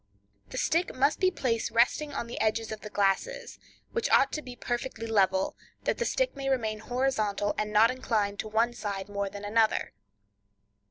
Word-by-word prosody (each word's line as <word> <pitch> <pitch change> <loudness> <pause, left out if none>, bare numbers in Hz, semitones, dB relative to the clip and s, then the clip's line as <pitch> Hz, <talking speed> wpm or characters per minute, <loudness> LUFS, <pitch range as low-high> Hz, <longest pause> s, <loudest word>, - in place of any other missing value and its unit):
The - - -7
stick 340 +3 +1
must 280 +3 +2
be 370 - +4
placed 245 -10 -1
resting 250 +6 +2
on 275 - -3
the 235 - -5
edges 220 0 0
of 215 - -6
the 210 - -7
glasses, 335 - 0 0.3
which 465 - -1
ought 275 - +5
to 305 - -3
be 250 -3 -9
perfectly 240 -1 -3
level, 190 -4 +2 0.3
that - - 0
the 475 - +1
stick - - 0
may 275 -1 -3
remain 220 -5 0
horizontal, 220 -4 0
and 210 0 -2
not 220 +3 +5
inclined 215 -5 -1
to - - -3
one 225 +3 +1
side 200 -4 -4
more 200 -1 -2
than 205 +1 -8
another. 220 +1 +2
230 Hz, 180 wpm, -29 LUFS, 210-265 Hz, 0.3 s, ought